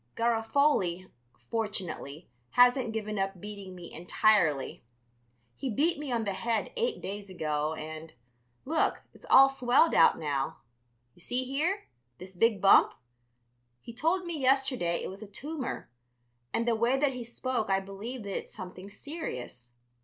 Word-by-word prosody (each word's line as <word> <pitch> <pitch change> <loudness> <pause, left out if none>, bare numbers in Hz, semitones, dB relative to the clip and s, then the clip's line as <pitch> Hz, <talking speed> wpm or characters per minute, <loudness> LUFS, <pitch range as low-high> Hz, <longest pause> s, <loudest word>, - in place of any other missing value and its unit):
Garofoli, 225 - +1 0.4
fortunately, 185 -9 -4 0.3
hasn't 245 -1 +5
given 215 -2 -3
up 195 -1 -2
beating 200 -2 -8
me 175 -1 -10
entirely. 175 -4 +2 0.7
He 270 - -4
beat 295 +7 +1
me 295 -3 -5
on 235 -2 0
the 200 -2 -2
head 225 +3 -1
eight 475 0 -1
days 200 0 -5
ago 155 -3 -1
and, 155 +1 -8 0.5
look, 315 +3 +1
it's - - -16
all 270 0 +9
swelled 270 +3 +3
out 165 - +6
now. 140 -4 -2 0.6
You - - -20
see 250 +7 -1
here, 310 +10 -1 0.3
this 185 +1 -11
big 225 +2 +3
bump? 195 +1 +6 0.8
He 230 - -10
told 335 +9 0
me 340 -3 -4
yesterday 260 -10 +2
it - - -3
was 195 +2 -10
a 215 - -8
tumor, 285 +6 -5 0.6
and 230 +1 -1
the 235 - +4
way 235 +4 +2
that 275 -1 +2
he 250 -1 -5
spoke 235 -1 -2
I 195 0 +3
believe 205 +5 -7
that 200 -1 -5
it's - - -5
something 185 +1 -8
serious. 125 - -7
220 Hz, 150 wpm, -29 LUFS, 185-260 Hz, 0.8 s, all